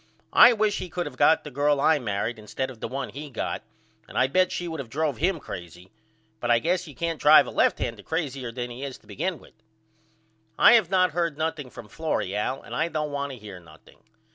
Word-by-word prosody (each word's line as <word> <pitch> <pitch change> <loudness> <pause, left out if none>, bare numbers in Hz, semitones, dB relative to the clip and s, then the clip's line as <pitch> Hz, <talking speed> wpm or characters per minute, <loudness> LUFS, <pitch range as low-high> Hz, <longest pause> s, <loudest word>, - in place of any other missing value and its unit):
I 245 - +9
wish 215 -2 +1
he 185 - -6
could 175 +1 -3
of - - -7
got 160 - +4
the 150 - -8
girl 145 +2 +2
I 155 +2 +4
married 110 0 -3
instead 130 +5 -4
of 120 - -14
the - - -4
one 135 +3 -4
he 145 +2 -8
got 125 - -3 0.5
and - - -7
I 130 - +5
bet 185 +8 +2
she 175 - -3
would 160 -2 -5
of 130 -4 -6
drove 145 0 -1
him 175 - 0
crazy. 90 - -9 0.5
But 120 - -3
I 120 - +6
guess 175 +7 0
you 145 - -11
can't 165 -2 -3
drive 150 +1 +8
a - - -7
left - - +2
hander - - -4
crazyer 140 -7 -3
than 120 0 -5
he 125 +3 -7
is 135 -2 -6
to - - -28
begin 185 -3 -3
with. - - -18 1.0
I - - +8
have 220 -8 +4
not 185 -2 +3
heard 170 -2 -1
nothing 155 -4 -3
from 115 - -11
Florrie 150 - -2
Al 130 +6 -2
and - - -8
I - - +1
don't 155 -2 -3
want 140 -1 -3
to - - -9
hear 100 -4 -10
nothing. 80 -2 -19
145 Hz, 235 wpm, -25 LUFS, 120-165 Hz, 1.0 s, I